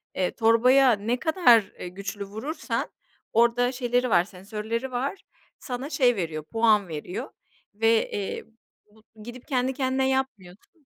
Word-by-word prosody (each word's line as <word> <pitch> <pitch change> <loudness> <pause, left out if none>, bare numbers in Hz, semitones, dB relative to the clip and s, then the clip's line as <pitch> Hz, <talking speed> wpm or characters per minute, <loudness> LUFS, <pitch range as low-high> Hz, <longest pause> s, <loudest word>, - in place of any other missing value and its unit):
eee, 185 -1 0
torbaya 250 +4 +5
ne 225 +4 -1
kadar, 285 - +5 0.2
eee, - - -5
güçlü 200 +3 -6
vurursan 220 +11 -4 0.4
orada 235 +2 +3
şeyleri 250 0 0
var, 175 -5 +4
sensörleri 215 +6 -5
var, 265 +9 -3 0.4
sana 255 +2 -5
şey 250 -6 +3
veriyor, 160 -5 -3
puan 215 +2 +2
veriyor 180 - -6 0.4
ve, 225 +2 +2
eee, 200 -1 -4 0.5
bu 220 0 -18
gidip 240 +2 -10
kendi 260 -2 0
kendine 265 0 0
yapmıyorsun. 265 - -5
230 Hz, 135 wpm, -25 LUFS, 205-260 Hz, 0.5 s, torbaya